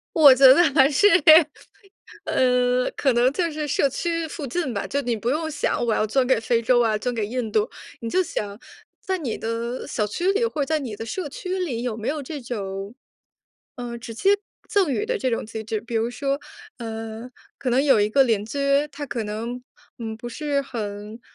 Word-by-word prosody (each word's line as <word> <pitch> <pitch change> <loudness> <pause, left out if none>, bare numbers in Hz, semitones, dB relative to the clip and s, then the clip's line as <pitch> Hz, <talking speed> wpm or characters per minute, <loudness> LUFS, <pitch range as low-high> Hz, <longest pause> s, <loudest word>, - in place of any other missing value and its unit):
我 290 -5 +9
觉 265 +2 +3
得 340 +6 +5
还 270 -1 +6
是， 310 +8 +4 1.2
呃， 250 0 +2
可 270 -3 +2
能 245 +2 +3
就 340 +2 -1
是 300 -1 -4
社 280 - +2
区 335 +4 -2
附 295 -2 -6
近 270 +1 -2
吧， 200 - -3
就 280 - -1
你 240 -2 -1
不 230 +3 -2
用 315 +3 -1
想 290 -4 -1
我 230 -2 +1
要 215 - +1
捐 255 +4 +1
给 255 -3 +2
非 230 +1 +1
洲 240 +1 +3
啊 225 -2 +2
捐 245 +3 -2
给 220 -3 -1
印 235 0 -3
度。 215 -1 +1 0.3
你 230 - -4
就 370 - +3
想 205 - -5 0.4
在 375 -1 -2
你 255 -9 -3
的 230 +2 -4
小 210 -2 -1
区 350 - 0
里 425 +4 +1
或 315 -11 -1
者 - - -12
在 315 +1 +1
你 245 -8 -6
的 225 - -6
社 345 +6 -4
区 365 +6 -4
里 270 -11 -2
有 245 -3 -3
没 220 0 -4
有 300 0 -2
这 290 +2 -6
种， 200 -4 -5 0.8
呃， 240 -2 -5
直 230 0 -8
接 385 - +2 0.4
赠 400 -7 +2
予 415 - -1
的 - - -1
这 260 - 0
种 230 - -2
机 220 0 -6
制。 215 0 -3
比 230 +2 -8
如 225 +1 +1
说， 275 +3 -2 0.4
呃， 225 +1 -6 0.3
可 260 - -2
能 255 +3 +3
有 270 -6 +4
一 205 - +2
个 270 +5 +4
邻 220 -4 +1
居， 230 +6 -6 0.3
他 290 +1 -6
可 240 -2 -3
能， 230 +4 -5 0.4
嗯， 225 -2 -5
不 240 +2 -7
是 285 +3 -1
很， 210 -2 -6
245 Hz, 230 characters per minute, -23 LUFS, 225-290 Hz, 1.2 s, 我